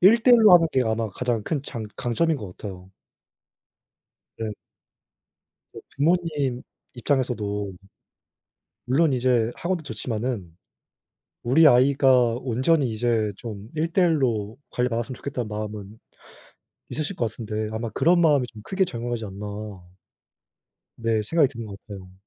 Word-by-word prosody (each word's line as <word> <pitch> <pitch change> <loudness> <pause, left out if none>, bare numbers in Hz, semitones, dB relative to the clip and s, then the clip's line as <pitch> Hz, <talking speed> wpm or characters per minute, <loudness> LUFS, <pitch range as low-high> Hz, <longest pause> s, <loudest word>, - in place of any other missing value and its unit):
1 225 +5 +6
대 250 - +6
1 - - +6
로 210 - +8
하는 165 -1 +6
게 130 - +3
아마 110 0 -1
가장 120 0 -2
큰 145 -4 -2
장 110 -5 -6
강점인 155 +7 0
것 100 -6 -9
같아요. 95 -2 -9 1.5
네. 110 -2 -3 1.4
부모님 150 -5 0 0.3
입장에서도 110 -6 -1 1.1
물론 140 +3 +3
이제 125 -2 +2
학원도 170 -2 -3
좋지마는 110 - -4 0.9
우리 150 +7 +5
아이가 130 -2 +5
온전히 130 +3 +1
이제 110 -1 0
좀 105 -2 -8
1 165 +2 -1
대 185 - +3
1 165 -4 +3
로 110 -4 -1
관리받았으면 125 0 -1
좋겠다는 125 -5 -4
마음은 105 0 -6 0.9
있으실 155 +5 -3
것 115 -3 -1
같은데 110 -2 -4
아마 115 +1 -3
그런 170 - +3
마음이 145 -6 +4
좀 105 -2 -11
크게 190 - 0
작용하지 120 -5 -4
않나 100 +1 -7 1.5
네 115 -2 0
생각이 150 +4 +3
드는 115 -2 -7
것 100 -1 -9
같아요. 95 -3 -10
120 Hz, 260 characters per minute, -24 LUFS, 110-145 Hz, 1.5 s, 로